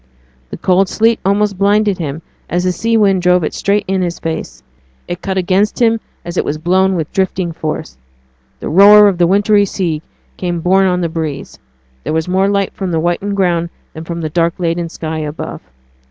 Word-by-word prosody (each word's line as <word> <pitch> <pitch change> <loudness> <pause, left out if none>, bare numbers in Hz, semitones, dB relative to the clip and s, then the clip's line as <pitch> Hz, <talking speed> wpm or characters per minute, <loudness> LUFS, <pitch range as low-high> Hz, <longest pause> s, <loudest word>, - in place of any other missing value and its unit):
The - - -7
cold 185 +1 +2
sleet 225 +1 +2
almost 200 0 +1
blinded 205 -1 +2
him 155 0 -4 0.3
as 175 +1 0
the 185 - +1
sea 225 +5 0
wind 195 -3 +3
drove 180 -1 +3
it - - -2
straight 200 +1 0
in 190 0 0
his 175 -1 -2
face; 65 - -5 0.4
it 175 +1 -5
cut 190 -1 -3
against 190 +3 +1
him 230 -2 +3 0.3
as 175 +1 -6
it - - +2
was 150 - -3
blown 185 +4 +2
with 160 -3 -3
drifting 185 -2 -1
force. 150 - -5 0.6
The - - -4
roar 205 +4 +8
of 190 -3 0
the 175 - +4
wintry 205 +2 +3
sea 175 -6 -2 0.4
came 175 -2 -2
borne 190 +3 +3
on 180 -1 0
the 170 - 0
breeze; 160 -4 -5 0.4
there - - -3
was 160 +1 -1
more 190 +2 +2
light 200 -1 0
from 190 -2 -4
the 165 -2 0
whitened 175 +5 -1
ground 170 -3 +1 0.2
than 160 - -8
from 170 0 -5
the 155 - -3
dark 170 +1 +1
laden 170 -1 -2
sky 160 -1 -5
above. 150 0 -6
180 Hz, 195 wpm, -15 LUFS, 165-195 Hz, 0.6 s, roar